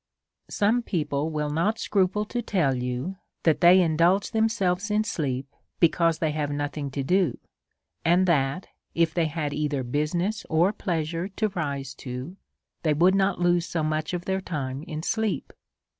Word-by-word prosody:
Some 220 Hz, +4 st, +2 dB
people 150 Hz, -7 st, -1 dB
will 150 Hz, -1 st, -2 dB
not 195 Hz, +9 st, +1 dB
scruple 205 Hz, 0 st, +1 dB
to 240 Hz, +3 st, -3 dB
tell 175 Hz, -, +1 dB
you 125 Hz, +8 st, -3 dB, 0.3 s
that 160 Hz, -2 st, +3 dB
they 180 Hz, +2 st, +8 dB
indulge 170 Hz, +3 st, +3 dB
themselves 215 Hz, -3 st, +1 dB
in 210 Hz, +1 st, +2 dB
sleep, 135 Hz, -, -3 dB, 0.2 s
because 165 Hz, -1 st, +3 dB
they 155 Hz, -1 st, 0 dB
have 150 Hz, -1 st, -2 dB
nothing 145 Hz, 0 st, -3 dB
to 135 Hz, +1 st, -3 dB
do; 180 Hz, -2 st, +2 dB, 0.7 s
and 175 Hz, +3 st, +4 dB
that 155 Hz, 0 st, +1 dB, 0.3 s
if 165 Hz, -1 st, +2 dB
they 165 Hz, -2 st, +1 dB
had 150 Hz, -2 st, -3 dB
either 145 Hz, -3 st, -1 dB
business 165 Hz, -, -1 dB
or 170 Hz, +6 st, +3 dB
pleasure 165 Hz, -2 st, -2 dB
to 210 Hz, +2 st, -1 dB
rise 140 Hz, -7 st, -3 dB
to^ 130 Hz, +7 st, -7 dB, 0.4 s
they 155 Hz, -3 st, +2 dB
would 180 Hz, +5 st, +5 dB
not 195 Hz, -1 st, +2 dB
lose 175 Hz, -1 st, +2 dB
so 165 Hz, -2 st, -2 dB
much 155 Hz, +2 st, -1 dB
of 175 Hz, 0 st, -5 dB
their 190 Hz, 0 st, -1 dB
time 140 Hz, -7 st, -4 dB
in 155 Hz, -1 st, -5 dB
sleep. 220 Hz, +1 st, -1 dB
165 Hz, 160 wpm, -26 LUFS, 150-190 Hz, 0.7 s, they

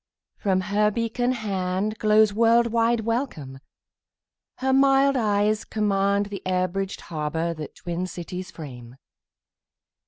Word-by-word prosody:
From 190 Hz, -2 st, +1 dB
her 210 Hz, +2 st, +2 dB
beacon 230 Hz, +3 st, -1 dB
handGlows 210 Hz, 0 st, +1 dB
world 230 Hz, +2 st, +4 dB
wide 230 Hz, 0 st, +2 dB
welcome; 220 Hz, -, -3 dB, 1.0 s
her 265 Hz, 0 st, 0 dB
mild 275 Hz, 0 st, +4 dB
eyes 215 Hz, -2 st, +1 dB
commandThe 200 Hz, -1 st, 0 dB
air 185 Hz, 0 st, +1 dB
bridged 195 Hz, +1 st, -4 dB
harbour 160 Hz, +1 st, -3 dB
that 155 Hz, -2 st, -8 dB
twin 175 Hz, +1 st, -4 dB
cities 180 Hz, +1 st, -7 dB
frame. 125 Hz, -6 st, -10 dB
205 Hz, 105 wpm, -24 LUFS, 180-230 Hz, 1.0 s, world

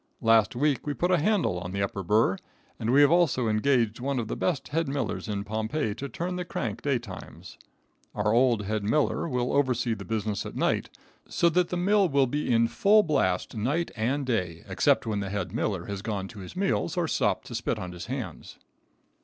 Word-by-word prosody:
Last 115 Hz, -1 st, +4 dB
week 140 Hz, +1 st, 0 dB
we 145 Hz, -, -1 dB
put 175 Hz, +1 st, 0 dB
a 180 Hz, -, +4 dB
handle 160 Hz, -, +1 dB
in 90 Hz, +1 st, -6 dB
the 100 Hz, 0 st, 0 dB
upper 100 Hz, 0 st, -3 dB
burr, 105 Hz, +1 st, +2 dB, 0.4 s
and 110 Hz, -, 0 dB
we 140 Hz, +3 st, +6 dB
have 145 Hz, +1 st, +6 dB
also 165 Hz, -9 st, +3 dB
engaged 115 Hz, 0 st, +1 dB
one 135 Hz, +2 st, -2 dB
of 115 Hz, -3 st, -3 dB
the -, -, -2 dB
best 165 Hz, -7 st, -1 dB
head 165 Hz, +2 st, 0 dB
millers 135 Hz, -5 st, -3 dB
in 100 Hz, -2 st, -2 dB
Pompeii 110 Hz, +3 st, -2 dB
to 140 Hz, +6 st, -6 dB
turn 180 Hz, +4 st, -3 dB
the 180 Hz, -, -2 dB
crank 115 Hz, -, -4 dB
day 140 Hz, -3 st, +1 dB
times. 90 Hz, -, -10 dB, 0.6 s
Our 105 Hz, +1 st, +1 dB
old 120 Hz, -3 st, +3 dB
head 105 Hz, +1 st, -2 dB
miller 150 Hz, +8 st, +1 dB
will 125 Hz, -2 st, -1 dB
oversee 125 Hz, -4 st, +1 dB
the -, -, -6 dB
business 110 Hz, -2 st, -2 dB
at -, -, -8 dB
night, -, -, 0 dB, 0.4 s
so 170 Hz, -, +3 dB
that 180 Hz, +1 st, +1 dB
the 180 Hz, -, -2 dB
mill 195 Hz, +1 st, +3 dB
will 140 Hz, -2 st, +3 dB
be 145 Hz, +1 st, -2 dB
in 115 Hz, 0 st, +4 dB
full 210 Hz, -, +4 dB
blast 95 Hz, -, 0 dB
night 140 Hz, +11 st, -1 dB
and 130 Hz, +6 st, -1 dB
day, 90 Hz, -9 st, -2 dB
except -, -, +2 dB
when 110 Hz, -2 st, -1 dB
the 100 Hz, -1 st, -3 dB
head 95 Hz, -2 st, -3 dB
miller 100 Hz, -6 st, -1 dB
has 100 Hz, -1 st, -5 dB
gone 100 Hz, -3 st, -3 dB
to 110 Hz, -, -11 dB
his 95 Hz, -, -9 dB
meals 190 Hz, -2 st, 0 dB
or 175 Hz, -2 st, +1 dB
stopped -, -, 0 dB
to -, -, -9 dB
spit -, -, -1 dB
on 90 Hz, -1 st, -6 dB
his 90 Hz, -1 st, -8 dB
hands. -, -, -6 dB
120 Hz, 210 wpm, -27 LUFS, 105-145 Hz, 0.6 s, we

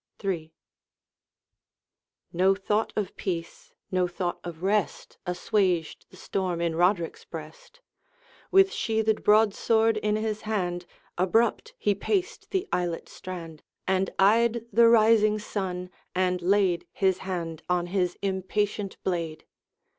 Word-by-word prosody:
III. 170 Hz, -5 st, -2 dB, 1.8 s
No 190 Hz, +3 st, +4 dB
thought 210 Hz, +3 st, 0 dB
of 205 Hz, -3 st, -2 dB
peace, 170 Hz, -3 st, -5 dB, 0.2 s
no 185 Hz, -1 st, +2 dB
thought 175 Hz, 0 st, -3 dB
of 175 Hz, -1 st, -8 dB
rest, 205 Hz, +2 st, -1 dB
Assuaged 180 Hz, -2 st, 0 dB
the 185 Hz, -, -16 dB
storm 185 Hz, -2 st, -2 dB
in 170 Hz, -1 st, 0 dB
Roderick's 175 Hz, 0 st, +1 dB
breast. -, -, -11 dB, 0.7 s
With 390 Hz, +1 st, +5 dB
sheathed 220 Hz, -1 st, 0 dB
broadsword 220 Hz, +1 st, +4 dB
in 210 Hz, 0 st, 0 dB
his 215 Hz, 0 st, -2 dB
hand, 180 Hz, -5 st, -2 dB, 0.3 s
Abrupt 225 Hz, +6 st, +1 dB
he 205 Hz, -, +2 dB
paced 370 Hz, -, -2 dB
the 385 Hz, 0 st, -1 dB
islet 175 Hz, -2 st, -2 dB
strand, 165 Hz, -4 st, -8 dB, 0.2 s
And 190 Hz, 0 st, +1 dB
eyed 230 Hz, +3 st, +3 dB
the 230 Hz, +2 st, +7 dB
rising 215 Hz, -2 st, +5 dB
sun, 185 Hz, -4 st, -4 dB, 0.2 s
and 180 Hz, -1 st, +1 dB
laid 185 Hz, -1 st, +2 dB
His 190 Hz, -2 st, +1 dB
hand 170 Hz, -4 st, -4 dB
on 180 Hz, -1 st, +1 dB
his 180 Hz, -1 st, -1 dB
impatient 195 Hz, +1 st, -1 dB
blade. 165 Hz, -4 st, -3 dB
190 Hz, 120 wpm, -27 LUFS, 180-215 Hz, 1.8 s, the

